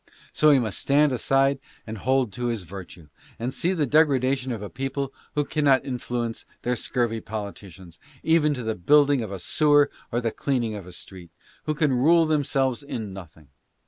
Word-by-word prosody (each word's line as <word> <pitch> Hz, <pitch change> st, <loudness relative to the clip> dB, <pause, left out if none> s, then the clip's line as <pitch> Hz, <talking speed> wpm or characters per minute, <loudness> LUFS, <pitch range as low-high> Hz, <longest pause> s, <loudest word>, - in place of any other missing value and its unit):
So 155 Hz, -, +4 dB
he 145 Hz, -, +6 dB
must 110 Hz, -6 st, -2 dB
stand 145 Hz, +1 st, +3 dB
aside 135 Hz, +2 st, +2 dB, 0.3 s
and 110 Hz, -1 st, -7 dB
hold 130 Hz, -2 st, +1 dB
to 120 Hz, 0 st, -3 dB
his 115 Hz, -5 st, -2 dB
virtue, 90 Hz, -3 st, -11 dB, 0.3 s
and 120 Hz, +3 st, -3 dB
see 175 Hz, -, 0 dB
the 160 Hz, -5 st, +1 dB
degradation 135 Hz, -3 st, +2 dB
of 110 Hz, -3 st, -4 dB
a -, -, -4 dB
people 135 Hz, +1 st, -3 dB, 0.2 s
who 145 Hz, -1 st, +1 dB
cannot 140 Hz, -4 st, +2 dB
influ 125 Hz, -2 st, -3 dB
ence 115 Hz, -1 st, -6 dB, 0.2 s
their 125 Hz, 0 st, 0 dB
scurvy 115 Hz, -1 st, -1 dB
politicians, 100 Hz, -5 st, -8 dB, 0.2 s
even 155 Hz, -2 st, +3 dB
to 125 Hz, -, -5 dB
the 110 Hz, 0 st, -1 dB
building 140 Hz, +8 st, +4 dB
of 110 Hz, -3 st, -5 dB
a 100 Hz, -, -4 dB
sewer 145 Hz, -, +3 dB, 0.2 s
or 120 Hz, -, 0 dB
the 115 Hz, -2 st, -1 dB
cleaning 120 Hz, -5 st, -1 dB
of 100 Hz, -4 st, -8 dB
a -, -, -10 dB
street; 90 Hz, 0 st, -10 dB, 0.4 s
who 155 Hz, -, -1 dB
can 150 Hz, -3 st, +2 dB
rule 160 Hz, +7 st, +4 dB
themselves 135 Hz, -4 st, 0 dB
in 110 Hz, -8 st, -6 dB
nothing. 80 Hz, -6 st, -12 dB
125 Hz, 185 wpm, -25 LUFS, 110-145 Hz, 0.4 s, he